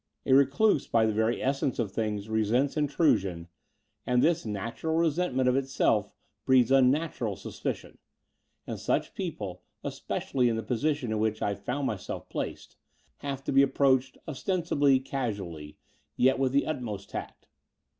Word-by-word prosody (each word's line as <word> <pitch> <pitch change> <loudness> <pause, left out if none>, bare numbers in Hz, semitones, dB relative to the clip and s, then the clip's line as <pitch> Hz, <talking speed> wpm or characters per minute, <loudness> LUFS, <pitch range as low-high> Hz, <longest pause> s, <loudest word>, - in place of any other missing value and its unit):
A - - +3
reduse 140 +6 +4
by 115 -1 +3
the 110 - +1
very 110 +2 0
essence 135 0 0
of 110 -5 -1
things 105 -1 -2
resents 110 +5 +1
intrusion, 115 - +1 0.6
and 125 0 +2
thif^ 170 -6 +2
natural 115 +10 -3
resentment 160 -5 +1
of 125 - +3
itself 130 -6 +1 0.3
breeds 130 -2 +4
unnatural 130 -4 +2
suspicion: - - -6 0.7
and - - -5
such - - -1
people, - - -5 0.2
especially 125 -3 -1
in 115 - 0
the 110 - -3
posi 140 +5 0
tion 125 -6 -5
in 110 - 0
which 110 0 0
I 100 - +1
found 125 +8 -3
myself 105 -7 -4
placed, - - -5 0.4
have 135 -1 -5
to - - -2
be 135 0 +6
approached 135 -1 +2
ostensibly 150 -3 +1
casually, 100 - -5 0.4
yet 130 +1 +4
with 135 -1 +2
the 140 +1 +2
ut 155 -4 -3
most 105 -4 -6
tact. - - -7
130 Hz, 150 wpm, -28 LUFS, 110-140 Hz, 0.7 s, be